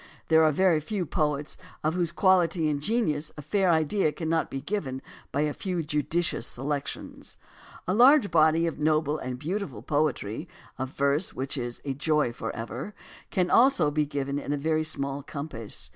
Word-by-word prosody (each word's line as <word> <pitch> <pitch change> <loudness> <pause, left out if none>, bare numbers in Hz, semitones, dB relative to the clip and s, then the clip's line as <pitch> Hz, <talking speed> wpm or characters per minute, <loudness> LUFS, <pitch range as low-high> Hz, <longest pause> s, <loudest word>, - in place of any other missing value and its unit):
There 160 0 +6
are 155 - +5
very 175 +1 +3
few 185 +4 -3
poets 150 -1 -1 0.2
of 155 +1 +1
whose 175 -2 0
quality 175 -3 +3
and 145 -1 -2
genius 155 -7 0
a 150 - -7
fair 190 +5 +1
idea 160 +1 +2
cannot 160 +1 -1
be 135 - -4
given 145 -5 -3 0.3
by 140 - 0
a 150 -1 0
few 180 -4 -3
judicious 150 -1 0
selections. 140 +2 -5 0.5
A 185 - +1
large 250 - +6
body 160 +1 +4
of 165 -3 -3
noble 155 0 +1
and 130 -1 -4
beautiful 155 - -4
poetry, 145 - -1 0.3
of 130 0 -2
verse 140 +6 0
which 135 +3 -3
is 120 -3 -5
"a 135 - -1
joy 150 -2 +1
forever," 115 - -6 0.3
can 180 -1 0
also 230 - +5
be 150 0 0
given 140 0 -2
in 145 - -5
a 145 - 0
very 155 +2 0
small 140 -2 -1
compass. 140 -6 -5
155 Hz, 170 wpm, -27 LUFS, 140-170 Hz, 0.5 s, There